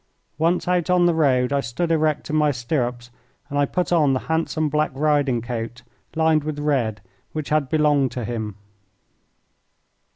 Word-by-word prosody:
Once 170 +3 +1
out 180 -1 +1
on 180 -1 +4
the 175 - +4
road 135 -5 +2
I 140 - +2
stood 140 +7 -2
erect 155 -1 0
in - - 0
my 150 -1 +3
stirrups, 125 -2 -2 0.4
and 145 - 0
I 145 - +3
put 180 +4 -2
on 150 -6 +4
the 130 - -1
handsome 160 -1 -1
black 150 +1 +1
riding 140 -5 +1
coat, 120 0 -5 0.3
lined 160 -1 +3
with 155 -1 -4
red, 130 -8 0 0.3
which 155 -2 -4
had 150 -3 +1
belonged 150 -4 +2
to 125 -3 -4
him. 110 -3 -4
145 Hz, 165 wpm, -22 LUFS, 125-155 Hz, 0.4 s, on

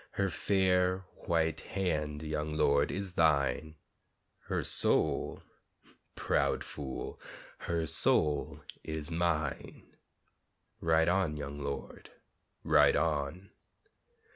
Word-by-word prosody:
Her 95 -2 0
fair 95 -1 +1 0.2
white 80 -2 +1
hand, 75 -6 -2
young 75 0 -3
lord, 70 -2 +3
is 95 -2 -4
thine, 75 -2 +1 0.7
Her - - -2
soul, - - +2 0.7
proud - - 0
fool, 70 -3 -7 0.5
her 85 -1 0
soul 75 -1 +2 0.2
is 80 0 -5
mine, 85 -2 -2 0.8
Ride 80 0 +3
on, 90 -4 +1
young 70 0 -6
lord, 70 -1 -6 0.5
ride - - +5
on! 80 +3 -1
80 Hz, 90 wpm, -31 LUFS, 75-90 Hz, 0.8 s, ride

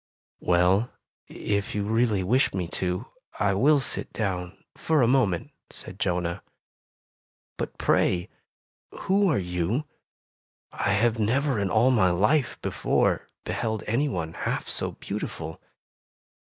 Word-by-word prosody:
"Well, 90 +6 +3 0.4
if 100 -1 -2
you 105 - 0
really 110 -2 +1
wish 125 +3 +2
me 90 -2 -2
to, 90 +5 -2 0.3
I 100 -1 +2
will 145 +9 +4
sit 135 - -3
down 90 -4 -3 0.2
for 155 -5 +2
a - - +4
moment," 115 -9 +2 0.2
said - - -3
Jonah. 85 -1 -1 1.1
"But, - - -5
pray, 90 -1 +2 0.7
who 195 +1 +3
are 150 - +2
you? 90 - -1 0.9
I 100 - 0
have 115 +2 +2
never^ 125 +2 +1
in 100 - 0
all 120 +5 +4
my 105 -7 +4
life 105 - +2
before, - - +1
beheld 110 -2 -2
anyone 110 - -1
half - - -3
so - - 0
beautiful!" - - -6
105 Hz, 125 wpm, -26 LUFS, 90-125 Hz, 1.1 s, will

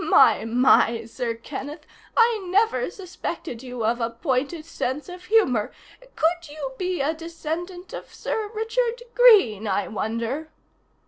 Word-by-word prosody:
My, - - +5
my, 230 -1 +4
Sir 230 0 -3
Kenneth, 290 +6 -7 0.3
I 460 -3 +4
never 375 - +2
suspected 345 - -6
you 250 -3 -4
of 235 +2 +1
a 230 - 0
pointed 275 +6 -2
sense 290 -3 -3
of 360 0 -10
humor 360 - +2 0.4
could 335 0 0
you 290 -3 -5
be 365 -3 -1
a 295 +4 +1
descendant 335 +2 -6
of - - -8
Sir 430 -2 -3
Richard 465 +2 -1
Greene, 395 - +6
I 200 0 0
wonder?" 230 +8 -3
310 Hz, 135 wpm, -24 LUFS, 240-365 Hz, 0.4 s, Greene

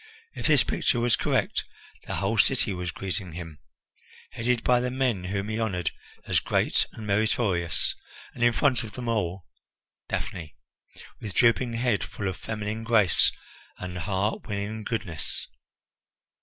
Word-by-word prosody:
If - - -2
this 150 -5 +6
picture 120 - +1
was 120 -1 +3
correct, - - +1 0.4
the - - -2
whole - - 0
city 100 - +4
was 90 -1 -3
greeting 95 -1 -4
him, 80 -3 -7 0.7
headed 120 0 0
by 125 -1 +5
the 125 +1 0
men 125 -8 0
whom 100 +2 -2
he 110 +1 -2
honoured 90 -7 0 0.3
as - - +3
great - - +2
and 110 - -8
meritorious, 100 -5 +1 0.4
and 120 - -2
in 120 - +6
front 125 -1 +3
of 110 -3 -7
them 125 -1 -5
all 95 -6 -1 0.6
Daphne, 80 -4 -4 0.6
with 100 -4 -6
drooping 120 0 +4
head, 115 -2 +1
full 100 - -4
of 95 +1 -2
feminine 110 0 -4
grace 110 -6 +4 0.5
and 90 -1 -6
heart 100 +5 -1
winning 105 +1 -3
goodness. 95 - -3
105 Hz, 145 wpm, -27 LUFS, 95-115 Hz, 0.7 s, this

